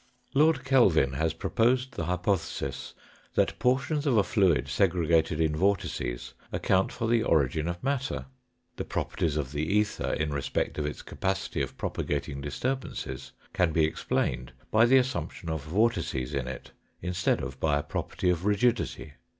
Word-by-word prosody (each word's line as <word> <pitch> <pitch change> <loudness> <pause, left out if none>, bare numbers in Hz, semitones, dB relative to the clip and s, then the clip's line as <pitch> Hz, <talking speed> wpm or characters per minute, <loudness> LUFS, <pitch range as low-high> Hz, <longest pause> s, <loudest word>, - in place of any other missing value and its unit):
Lord 150 -1 +4
Kelvin 100 - +4
has 80 +4 0
proposed 125 +8 +1
the 85 - -4
hypothesis 90 +1 -2 0.4
that - - +1
portions 140 +4 +1
of 125 -5 +3
a 100 - +5
fluid 85 -11 +2
segregated 85 -1 +2
in 80 -2 +2
vortices 80 -9 -1 0.2
account 95 0 +1
for 115 - -3
the 115 0 +3
origin 75 - +2
of 85 0 -4
matter. 135 -1 -1 0.5
The - - -2
properties 75 -2 -2
of 70 -3 -2
the 75 0 -2
ether 105 +6 0
in 75 -1 -1
respect 70 +2 -2
of 75 - -1
its 75 - -6
capacity 95 0 -2
of - - -4
propagating 70 -1 -3
disturbances 75 - -4 0.2
can 90 -3 +2
be 80 -1 +4
explained 65 -4 -2 0.2
by 110 +2 +6
the 130 +3 +6
assumption 125 -9 -1
of 80 -3 -4
vortices 80 - 0
in 70 -3 -2
it 65 - -7 0.3
instead 90 0 +1
of 65 0 -6
by 75 -1 +2
a 75 - -2
pro - - -2
perty 90 - -1
of 85 0 -2
rigidity. 105 -6 0
90 Hz, 160 wpm, -28 LUFS, 75-115 Hz, 0.5 s, by